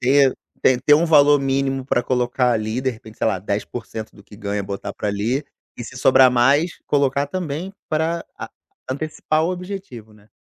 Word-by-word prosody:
ter 135 +1 +4 0.3
ter 125 -1 +4
ter 145 +2 +6
um 160 - +3
valor 145 -2 +6
mínimo 135 -1 0
pra 125 -2 +1
colocar, 125 0 +1
ali, 110 +2 -1
de 130 0 0
repente, 110 -2 -13
sei - - 0
lá, 110 -4 +1
10% 110 +3 -5
do 100 - -15
que - - -15
ganha, 100 -1 -3
botar 100 +1 -5
pra, - - -5
ali, 115 +8 -1 0.3
e 120 - -6
se 130 - -10
sobrar 130 0 +6
mais, 140 +8 +3 0.2
colocar 140 0 +1
também 170 +2 -4 0.2
pra 165 +2 -1
a - - -7 0.4
antecipar 155 +2 -1
o 175 - 0
objetivo, 180 - -7
né? 105 0 -22
130 Hz, 185 wpm, -21 LUFS, 110-145 Hz, 0.4 s, ter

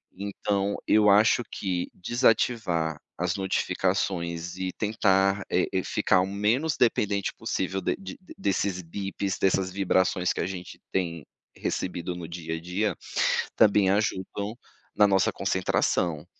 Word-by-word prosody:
Então 100 0 -1
eu 105 -1 +5
acho 105 +4 +5
que 90 -3 -2
desativar 90 - +1 0.2
as 90 0 -1
notificações 90 -3 -1
e 95 0 -2
tentar, 100 -2 +2
eh 90 - +2
eh, 95 -1 +1
ficar 95 - +2
o 95 - -1
menos 110 +10 0
dependente 105 -4 +1
possível 95 +1 -2
de - - 0
de 195 - -8 0.2
desses 95 -2 -1
bips 95 +2 -4
dessas 95 -1 +2
vibrações 95 -1 +1
que - - -4
a - - 0
gente 90 -1 -7
tem 85 -5 -2 0.3
recebido 90 -1 -3
no 85 -2 -7
dia 85 -1 -5
a - - -9
dia 95 +5 -1 0.6
também 105 -3 +5
ajudam 100 +1 -1 0.4
na 105 - +6
nossa 95 -2 +3
concentração. 80 -4 0
95 Hz, 130 wpm, -27 LUFS, 90-100 Hz, 0.6 s, na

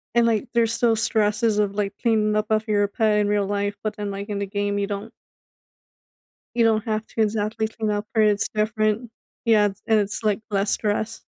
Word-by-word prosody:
and, 235 - +5
like, 230 +2 +1
there's 230 -1 +2
still 230 -1 +2
stresses 215 0 +1
of, 200 -1 0
like, 200 -1 -1
cleaning 215 -3 +2
up 215 0 0
off 220 +1 +1
your 205 -1 +2
pet 215 0 +1
in 205 - +1
real 205 -1 +1
life. 205 0 -1
But 215 - -2
then, 205 -1 -4
like, 200 +1 -6
in 200 -1 -2
the 200 - -1
game, 205 +1 -1
you 200 - -1
don't 205 +2 -5 1.4
you 235 - +3
don't 220 -2 +2
have 215 -1 -2
to 225 - -3
exactly 220 +1 0
clean 220 -1 -3
up 205 +1 -2
per. 220 - +3
It's 205 -1 +2
different. 215 +1 0 0.3
Yeah. 215 -2 +5 0.2
And 220 -1 +4
it's, 205 +2 -2
like, 210 -2 +1
less 200 +1 +1
stress. 215 +1 -1
215 Hz, 205 wpm, -23 LUFS, 205-220 Hz, 1.4 s, and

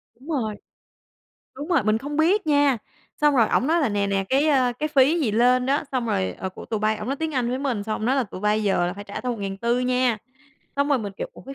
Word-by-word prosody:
Đúng 270 +7 -15
rồi. 225 -9 -1 1.0
Đúng 290 +5 -7
rồi, 340 -9 +3
mình 215 +1 +2
không 290 +4 -5
biết 340 +4 +2
nha, 285 -4 +3 0.4
xong 295 -1 +4
rồi 230 -3 +4
ổng 260 - +1
nói 335 +2 +2
là 275 - +2
"Nè, 205 -1 0
nè, 195 -1 0
cái, 280 +4 +2
a, 255 -4 +3
cái 305 +6 -3
phí 290 +4 +3
gì 235 -8 +1
lên 250 +3 +3
á" 280 +3 +1
xong 250 -3 -1
rồi, 95 - 0
"Ờ, 190 - -3
của 185 - -10
tụi 220 -2 -3
bay" 215 0 +1
ổng 210 - -6
nói 275 +2 -2
tiếng 320 -1 -3
Anh 245 -2 0
với 255 +1 -2
mình 255 -7 -2
xong 215 -1 -2
ông 215 - -4
nói 265 +2 +2
là 265 - +2
"Tụi 190 -2 -9
bay 210 +1 +1
giờ 190 -3 +1
là 180 - -2
phải 205 +1 -9
trả 200 - -6
tao 250 -1 -2
1.400 220 +3 -2
nha." 250 -2 +1 0.6
Xong 280 +1 +1
rồi 280 -3 +3
mình, 205 -3 -5
kiểu: - - -4
"Ủa - - -14
cái 275 +1 -9
250 Hz, 275 wpm, -24 LUFS, 215-280 Hz, 1.0 s, xong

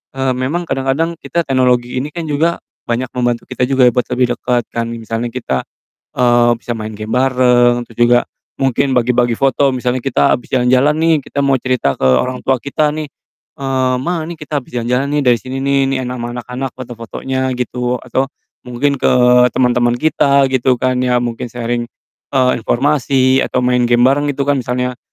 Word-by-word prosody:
eee, 135 -1 0
memang 135 +8 -2
kadang-kadang 135 +5 -1
kita 170 - -2
teknologi 125 -3 +1
ini 135 - -3
kan 170 +2 -5
juga 160 +3 0 0.3
banyak 120 +2 -2
membantu 120 -1 0
kita 125 - 0
juga 135 -1 +2
ya, - - +4
buat 125 +1 -1
lebih 125 -1 +1
deket 125 -1 0
kan, 115 0 -2
misalnya 115 0 -4
kita, 115 - -3 0.6
eee, 120 -1 +4
bisa 120 +1 -5
main 110 -1 -5
game 110 +1 -4
bareng, 125 -2 +3
terus 115 - -17
juga 120 0 +5 0.4
mungkin 135 +1 +1
bagi-bagi 120 -2 +1
foto, 135 +1 +2
misalnya 125 -1 -2
kita 135 -1 +2
habis 120 - -7
jalan-jalan 130 +4 +2
nih, 165 0 +3
kita 140 - -8
mau 135 - +3
cerita 125 - 0
ke - - -13
orang 125 - +1
tua 130 -1 +1
kita 150 +4 0
nih, 155 0 -4 0.5
eee, 130 -2 0
"Ma, 170 +2 -2
nih 170 - -6
kita 150 0 -3
habis 125 - -17
jalan-jalan 125 +3 0
nih, 145 - +1
dari 125 -3 +3
sini 130 +2 -6
nih, 140 0 +2 0.2
nih - - -1
enak 125 0 -4
ama 120 0 -4
anak-anak 125 +2 -5
foto-fotonya," 130 +2 -4
gitu, 125 0 -2
atau, 130 +2 -1 0.4
mungkin 135 +3 -1
ke - - +2 0.4
teman-teman 120 -1 +2
kita, 140 0 +2
gitu 130 0 +2
kan 130 +1 -1
ya, 125 -1 +1
mungkin 120 +1 -4
sharing, 120 0 -3 0.5
eee, 130 -1 +4
informasi 130 +1 +2
atau 125 - -1
main 125 -1 +2
game 120 0 +3
bareng 145 +2 +2
gitu 140 - -2
kan, 140 0 +1
misalnya. 125 0 -2
125 Hz, 185 wpm, -16 LUFS, 120-135 Hz, 0.6 s, juga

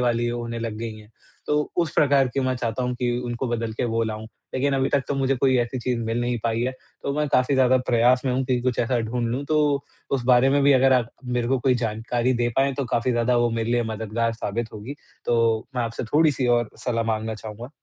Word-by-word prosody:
वाली 120 -1 +1
होने 120 -1 -4
लग 115 -2 -4
गई 115 -1 -4
हैं। 105 +1 -16 0.4
तो 150 - +1 0.2
उस 170 -3 +1
प्रकार 140 -2 +4
की 135 +3 -2
मैं 130 0 0
चाहता 120 +1 -2
हूँ 125 0 -1
कि 120 0 -1
उनको 120 +2 -3
बदल 115 -1 -2
के 115 - -2
वो 115 -1 0
लाऊँ, 110 0 -4 0.3
लेकिन 140 +2 +1
अभी 135 0 +1
तक 140 - +3
तो 145 - 0
मुझे 135 -1 +1
कोई 130 0 +3
ऐसी 120 +2 -1
चीज़ 120 0 -1
मिल 115 +2 -1
नहीं 120 -1 -1
पाई 115 0 0
है, 130 +2 0 0.3
तो 140 - -1
मैं 150 - +1
काफ़ी 135 0 +2
ज़्यादा 130 -1 +4
प्रयास 125 +1 +4
में 130 - +1
हूँ 130 +1 0
कि 125 -1 0
कुछ 125 -1 -1
ऐसा 120 +1 +1
ढूँढ़ 115 +1 -2
लूँ। 135 +4 -2
तो 150 -2 +2 0.3
उस 130 -3 0
बारे 125 +1 +5
में 140 0 +3
भी 140 0 +6
अगर 135 0 +5
आप 120 -2 +2
मेरे 125 -1 -1
को 135 -1 +2
कोई 130 0 +2
जानकारी 120 +2 -1
दे 120 0 +1
पाएँ, 135 +1 +3
तो 140 - -2
काफ़ी 120 +1 0
ज़्यादा 120 +1 +2
वो 120 0 +2
मेरे 115 0 -2
लिए 120 -1 +2
मददगार 110 +1 -2
साबित 115 +1 -4
होगी, 110 +7 -7 0.3
तो 115 -2 +2
मैं 120 - +1
आपसे 115 +1 -4
थोड़ी-सी 145 0 +2
और 120 -2 +2
सलाह 115 -2 0
माँगना 110 0 -1
चाहूँगा। 110 +3 -8
120 Hz, 240 wpm, -24 LUFS, 115-130 Hz, 0.4 s, भी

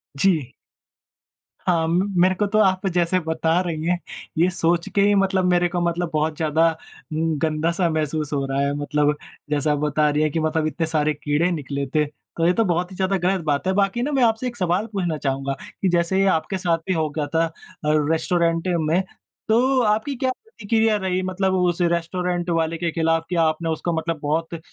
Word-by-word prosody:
जी। 150 -5 +1 1.1
हाँ, 165 -3 +1
म 180 +4 +1
मेरे 185 +1 +4
को 205 - 0
तो 215 +2 +1
आप 190 -2 +2
जैसे 175 +1 +2
बता 160 0 0
रही 165 -3 -3
हैं 180 - +2 0.4
ये 175 +3 +4
सोच 170 0 0
के 200 - +4
ही 205 +1 +4
मतलब 190 -1 +2
मेरे 175 0 +3
को 175 0 -2
मतलब 170 0 -1
बहुत 155 0 0
ज़्यादा 160 +1 +2
अ, 160 - -4 0.4
गन्दा-सा 160 +2 0
महसूस 155 -1 -2
हो 140 -1 0
रहा 135 0 -2
है 140 0 0
मतलब 150 0 +1 0.3
जैसा 150 0 +1
आप 150 - +1
बता 150 0 +2
रही 150 +1 +1
हैं 155 - +1
कि 165 - -1
मतलब 155 0 0
इतने 165 +1 -2
सारे 155 -1 +1
कीड़े 150 +4 0
निकले 140 -3 -3
थे, 150 +2 +1
तो 165 +2 -5
ये 180 - +4
तो 225 - +2
बहुत 175 0 0
ही - - -9
ज़्यादा 190 +1 0
गलत 185 +1 0
बात 145 +3 0
है। 190 - +2
बाकी 200 +4 +1
न 290 +4 -1
मैं 260 - +3
आपसे 225 +2 +2
एक 240 - -5
सवाल 180 +2 0
पूछना 175 -5 -1
चाहूँगा? 135 -1 -2 0.3
कि 190 - +2
जैसे 175 +3 +2
आपके 190 +2 0
साथ 175 -3 +1
भी 185 - +1
हो 160 -3 0
गया 150 0 -3
था 165 +1 +4
अ, 165 - -6 0.6
रेस्टोरेंट 165 +1 +1
में, 160 +3 +2 0.5
तो 255 +4 +3
आपकी 220 +5 +1
क्या 260 0 0
प्रतिक्रिया 225 - 0
रही? 185 -2 -1
मतलब 185 +1 0
उस 175 0 +1
रेस्टोरेंट 175 +1 -1
वाले 165 0 0
के 170 0 -1
खिलाफ 165 0 +1
क्या 170 -2 +2
आपने 160 +1 0
उसको 160 +2 -2
मतलब 160 0 -2
बहुत 160 +3 -1
अ, 165 - -4
170 Hz, 205 wpm, -22 LUFS, 155-185 Hz, 1.1 s, मेरे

